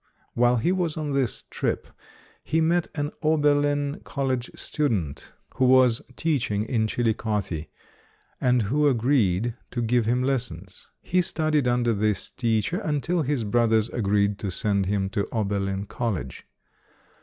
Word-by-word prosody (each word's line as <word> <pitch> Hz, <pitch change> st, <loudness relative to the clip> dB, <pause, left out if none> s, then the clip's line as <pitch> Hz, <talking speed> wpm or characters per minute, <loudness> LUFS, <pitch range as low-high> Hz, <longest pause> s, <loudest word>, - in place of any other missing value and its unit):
While 120 Hz, +1 st, +3 dB
he 120 Hz, +10 st, +1 dB
was 175 Hz, -4 st, -1 dB
on 150 Hz, -2 st, -2 dB
this 135 Hz, -3 st, -1 dB
trip, -, -, -2 dB, 0.6 s
he 160 Hz, -, 0 dB
met 165 Hz, +1 st, +2 dB
an 145 Hz, 0 st, -2 dB
Oberlin 145 Hz, -2 st, +2 dB
College 130 Hz, -3 st, -2 dB
stu 150 Hz, -1 st, -1 dB
dent 85 Hz, -, -3 dB, 0.3 s
who 130 Hz, -, +3 dB
was 125 Hz, -2 st, +5 dB
teaching 125 Hz, -10 st, 0 dB
in 110 Hz, -2 st, 0 dB
Chillicothe, 105 Hz, -8 st, -1 dB, 0.8 s
and 125 Hz, -2 st, +3 dB
who 145 Hz, +9 st, +2 dB
agreed 120 Hz, -5 st, +2 dB, 0.2 s
to 120 Hz, -, -4 dB
give 120 Hz, -1 st, +1 dB
him 125 Hz, +2 st, +2 dB
lessons. 100 Hz, -9 st, -3 dB, 0.2 s
He 180 Hz, +1 st, +2 dB
studied 155 Hz, -5 st, 0 dB
under 120 Hz, -1 st, +2 dB
this 105 Hz, -1 st, -1 dB
teacher 115 Hz, -, 0 dB
until 160 Hz, +2 st, 0 dB
his 140 Hz, -4 st, -1 dB
brothers 110 Hz, 0 st, +2 dB
agreed 100 Hz, -2 st, +1 dB
to 100 Hz, -, -3 dB
send 100 Hz, 0 st, 0 dB
him 100 Hz, -1 st, 0 dB
to 100 Hz, -2 st, -1 dB
Oberlin 100 Hz, -2 st, -1 dB
College. 100 Hz, -, -4 dB
120 Hz, 140 wpm, -25 LUFS, 105-145 Hz, 0.8 s, was